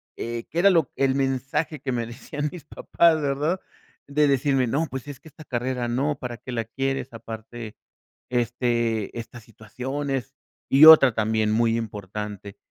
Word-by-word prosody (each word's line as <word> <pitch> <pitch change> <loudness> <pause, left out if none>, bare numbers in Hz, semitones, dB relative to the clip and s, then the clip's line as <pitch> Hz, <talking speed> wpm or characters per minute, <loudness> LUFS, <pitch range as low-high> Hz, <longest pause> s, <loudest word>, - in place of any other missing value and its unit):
eh, 115 0 -5
qué 165 - -2
era 200 +3 +6
lo 165 -8 +3
el 135 -1 +1
mensaje 135 +3 -1
que 135 - -3
me 120 -2 -1
decían 145 +6 -5
mis 175 -5 -10
papás, 160 +2 +2
¿verdad? 145 +6 0 0.5
De 145 +1 +2
decirme: 135 -1 +2
"No, 150 +7 0
pues 135 +1 -6
es 145 -3 -8
que - - -17
esta 155 +1 -13
carrera, 125 -2 -2
no. 135 +5 0
¿Para 120 -2 -6
qué 130 - -9
la 115 -2 -1
quieres? 135 +4 -3
Aparte, 115 0 -8 0.6
este, 120 -3 -1
estas 115 0 -9
situaciones". 130 +5 -5 0.3
Y 140 +3 +7
otra, 145 -6 +9
también 110 0 +1
muy 115 +1 +2
importante. 105 -2 -6
125 Hz, 160 wpm, -24 LUFS, 115-145 Hz, 0.6 s, otra